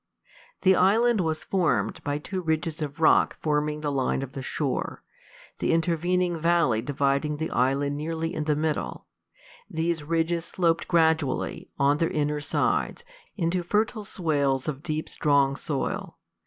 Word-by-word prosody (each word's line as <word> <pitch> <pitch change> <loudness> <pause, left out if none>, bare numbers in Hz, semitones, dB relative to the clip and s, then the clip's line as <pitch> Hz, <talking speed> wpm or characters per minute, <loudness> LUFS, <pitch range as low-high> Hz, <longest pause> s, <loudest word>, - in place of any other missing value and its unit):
The 190 -1 +6
island 215 +4 +4
was 160 -2 -1
formed 185 -4 0
by 145 -1 -1
two 185 +5 -4
ridges 160 0 -2
of 145 +1 -4
rock 160 - +4
forming 150 0 0
the 145 -1 -1
line 135 0 0
of 135 - -7
the 135 - -6
shore, 135 0 -3 0.6
the - - +1
intervening 175 +1 +1
valley 165 -9 +2
dividing 140 +2 0
the 160 +1 -3
island 140 +3 +1
nearly 165 +2 -3
in 155 -1 -3
the 150 -1 +2
middle. 155 0 -2 0.6
These 165 0 -1
ridges 165 +2 0
sloped 170 -3 0
gradually, 160 -4 +1
on 140 +1 +3
their 165 - +2
inner 150 0 -1
sides, 470 - 0 0.3
into 175 0 0
fertile 215 +5 0
swales 145 -9 0
of 145 -2 -3
deep, 155 -1 -3
strong 140 -2 +2
soil. 145 -1 -3
155 Hz, 145 wpm, -26 LUFS, 145-170 Hz, 0.6 s, The